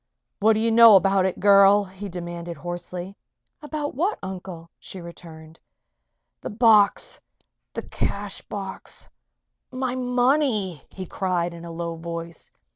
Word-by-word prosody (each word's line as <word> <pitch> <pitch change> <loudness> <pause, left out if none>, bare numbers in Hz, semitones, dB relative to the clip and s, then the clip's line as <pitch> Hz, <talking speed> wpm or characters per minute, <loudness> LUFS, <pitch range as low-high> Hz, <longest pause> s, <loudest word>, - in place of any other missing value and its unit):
"What 220 +1 +4
do 215 - 0
you 225 +1 +1
know 230 -2 +8
about 195 0 +4
it, 185 - -4
girl?" 200 0 +6
he 195 +1 -9
demanded, 170 -1 -6
hoarsely. 175 +3 -6 0.5
"About 295 -1 -4
what, 365 +10 -1
Uncle?" 180 -3 -8
she 190 - -9
returned. 165 -2 -12 0.8
"The - - -5
box 215 -2 +3 0.5
the - - -5
cash 200 0 -3
box 195 -2 -8 0.6
my 255 -1 -2
money!" 250 - +1
he 190 - -8
cried, 175 -1 -2
in 170 0 -10
a 170 - -7
low 170 0 -5
voice. 170 0 -7
190 Hz, 130 wpm, -24 LUFS, 170-220 Hz, 0.8 s, know